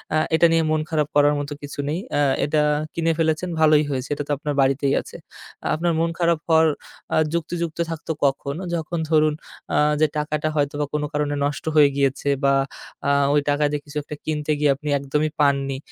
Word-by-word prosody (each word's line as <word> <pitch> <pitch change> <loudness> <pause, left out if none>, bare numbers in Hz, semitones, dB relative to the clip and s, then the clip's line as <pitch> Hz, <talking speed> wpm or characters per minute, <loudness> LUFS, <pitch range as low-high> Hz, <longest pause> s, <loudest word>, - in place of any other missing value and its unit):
আ - - +4 0.2
এটা 165 - +5
নিয়ে 165 0 +3
মন 155 0 +1
খারাপ 150 -3 +1
করার 145 0 +5
মতো 145 +1 -4
কিছু 145 0 -8
নেই। 160 +4 -1 0.2
আ - - +2 0.3
এটা 150 +1 +1 0.3
কিনে 165 0 +1
ফেলেছেন 160 +2 0
ভালোই 155 -1 +5
হয়েছে। 130 -1 -3
এটা 145 - -3
তো - - -3
আপনার 150 0 -3
বাড়িতেই 135 +1 +2
আছে। - - -11 0.6
আপনার 170 +2 0
মন 165 +1 +1
খারাপ 170 -2 +2
হওয়ার 160 -1 +5 0.5
আ - - +3 0.2
যুক্তিযুক্ত 170 0 -3
থাকতো 165 0 -5
কখন? 140 0 -1 0.2
যখন 165 +1 -3
ধরুন 155 -1 +3 0.4
আ - - +3 0.2
যে 155 - +5
টাকাটা 150 0 -1
হয়তোবা 145 0 0
কোনো 150 0 0
কারণে 145 0 -1
নষ্ট 145 0 -3
হয়ে 150 -2 +7
গিয়েছে 140 0 0
বা 140 0 +4 0.5
আ - - +3 0.2
ওই 145 - +4
টাকা 145 +1 +1
দিয়ে 150 -1 -2
কিছু 145 0 -8
একটা 150 - -7
কিনতে 150 -1 -2
গিয়ে 145 -1 +4
আপনি 150 +2 -6
একদমই 150 +3 -1
পাননি, 140 -2 +1
150 Hz, 190 wpm, -22 LUFS, 145-160 Hz, 0.6 s, হয়ে